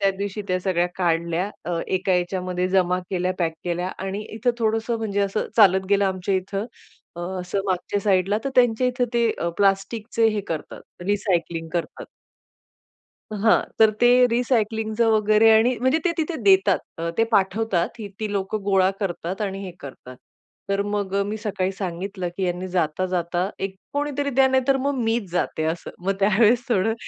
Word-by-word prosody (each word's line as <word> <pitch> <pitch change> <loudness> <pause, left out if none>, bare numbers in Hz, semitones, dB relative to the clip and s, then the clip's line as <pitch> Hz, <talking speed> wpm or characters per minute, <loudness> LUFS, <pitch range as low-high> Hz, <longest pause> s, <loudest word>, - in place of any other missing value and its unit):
त्या 195 -1 +3
दिवशी 205 +1 -3
त्या 185 - +1
सगळ्या 180 -2 +1
काढल्या 170 +1 0
अ, 170 0 -2
एका 185 0 0
याच्यामध्ये 180 0 -1
जमा 180 -1 +2
केल्या, 185 -1 0
पॅक 165 -2 0
केल्या 175 +1 -2
आणि 195 +2 -3
इथे 225 +3 +1
थोडंसं 225 +1 0
म्हणजे 205 -3 -1
असं 200 +1 -1
चालत 190 -3 +5
गेलं 200 0 +4
आमच्या 190 0 -1
इथं 195 +3 -2 0.5
अ, - - -5 0.2
असं 180 +2 -2
मागच्या 190 +2 -1
साइडला 195 0 +2
तर 275 - -1
त्यांच्या 245 0 +3
इथे 250 0 0
ते 235 -1 +3 0.3
प्लास्टिकचे 205 +3 +1
हे 215 -1 -1
करतात 160 +2 -7
रिसायकलिंग 170 -5 -1
करतात. 175 -2 -3 1.3
हां. 215 +1 +3 0.2
तर 220 -1 +6
ते 240 - +6 0.2
रिसायकलिंगचं 225 -2 +1
वगैरे 215 +1 +4
आणि 240 +3 +3
म्हणजे 260 +5 +3
ते 355 - +3
तिथे 320 +1 -1
देतात. 195 -1 +5 0.2
अ, 165 0 -2
ते 225 - +5
पाठवतात. 195 -2 +1
ती 210 -2 -6
ती 215 - -2
लोकं 200 +1 -2
गोळा 190 -1 +3
करतात 185 -1 -3
आणि 195 -1 -3
हे 185 - -6
करतात. 130 -2 -10 0.5
तर 200 0 +1
मग 205 -1 -3
अ, - - +3
मी 210 +1 -3
सकाळी 200 -3 -2
सांगितलं 185 0 -4
की 190 - -1
"यांनी 180 +1 -2
जाता, 175 0 0
जाता 180 0 -1
एक 195 0 -3 0.2
कोणीतरी 285 0 -1
द्या 265 0 +4
नाहीतर 265 +1 +2
मग 280 +2 0
मीच 225 -4 -1
जाते," 175 -2 -1
असं. 170 - -8 0.2
मग 195 - +3
त्यावेळेस 220 +4 +4
थोडं 225 -2 +2
195 Hz, 170 wpm, -23 LUFS, 185-220 Hz, 1.3 s, तर